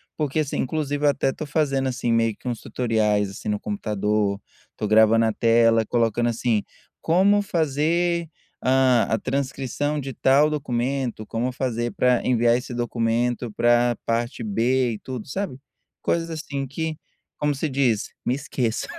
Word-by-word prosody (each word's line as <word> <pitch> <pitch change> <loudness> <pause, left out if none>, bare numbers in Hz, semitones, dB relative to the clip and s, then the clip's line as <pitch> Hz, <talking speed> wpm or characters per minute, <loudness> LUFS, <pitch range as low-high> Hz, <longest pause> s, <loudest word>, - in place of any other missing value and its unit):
porque, 150 0 -1
assim, 145 - -3
inclusive 145 +1 -2
eu - - +6
até 135 -1 +1
tô 155 - -6
fazendo, 135 -3 0
assim, 120 -1 -2
meio 115 -2 +2
que - - -11
uns 120 -3 -3
tutoriais, 105 -4 0
assim, 95 - -6
no 105 -1 0
computador, 105 -1 -1 0.4
tô 105 - -2
gravando 110 +1 +5
a 110 - +1
tela, 115 0 +4
colocando 120 +1 +1
assim: 115 -2 0 0.4
"Como 195 +5 +4
fazer, 170 0 0 0.3
hã, 130 -2 +4
a 110 - +2
transcrição 135 +3 -2
de 135 0 -6
tal 140 +5 +4
documento"; 130 -4 -2
"como 115 +4 -2
fazer 120 -2 -2
pra 125 -1 +2
enviar 120 -1 +3
esse 125 0 -6
documento 120 0 -1
pra 120 +1 +3
parte 115 +1 -1
b" 120 +4 +1
e 105 - -7
tudo, 125 -4 -6
sabe? 190 -2 -4 0.4
Coisas 170 0 0
assim 145 -4 -4
que 160 +3 -4 0.4
como 150 -1 0
você 150 +3 -2
diz: 130 -6 +1 0.2
"me 125 - +1
esqueçam". 130 -5 -2
125 Hz, 155 wpm, -23 LUFS, 115-140 Hz, 0.4 s, eu